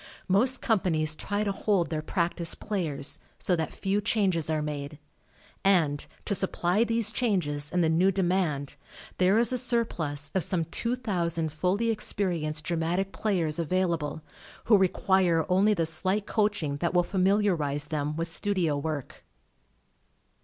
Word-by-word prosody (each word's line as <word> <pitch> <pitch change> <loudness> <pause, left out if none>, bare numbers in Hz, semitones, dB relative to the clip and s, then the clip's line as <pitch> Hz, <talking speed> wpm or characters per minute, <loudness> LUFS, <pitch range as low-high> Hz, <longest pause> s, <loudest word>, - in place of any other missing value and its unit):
Most 245 +7 +2
companies 165 -8 +1
try 205 +5 -2
to 205 - 0
hold 195 -3 0
their 155 -1 -1
practised 170 0 -1
players, 155 -9 -2 0.2
so 180 - +1
that 160 -2 -2
few 195 +2 -1
changes 195 -7 0
are 155 -1 +1
made, 145 0 -5 0.7
and, 165 -7 +3 0.2
to - - 0
supply 190 +1 +1
these 230 -2 +2
changes 170 - -1
and 180 -1 +2
the - - +3
new 170 +4 +3
demand, 175 -7 -1 0.4
there 185 +3 +4
is 235 +2 +3
a 250 - +1
surplus 165 - -1
of 190 - +2
some 170 -1 +1
2,000 175 -6 -1
fully 190 +9 0
experienced 170 -8 -2
dramatic 175 +4 -1
players 175 -7 -1
avail 180 +2 +1
able, 155 -1 -4 0.4
who 225 - +5
require 185 -3 +2
only 200 +4 +3
the 165 -3 0
slight 190 +5 0
coach 210 -4 0
ing 140 -1 -2
that 170 +4 -2
will 175 - +5
familiarize 180 -7 +1
them 150 0 -2
with 165 +1 -1
studio 175 -3 0
work. 150 -2 -5
180 Hz, 145 wpm, -27 LUFS, 155-200 Hz, 0.7 s, who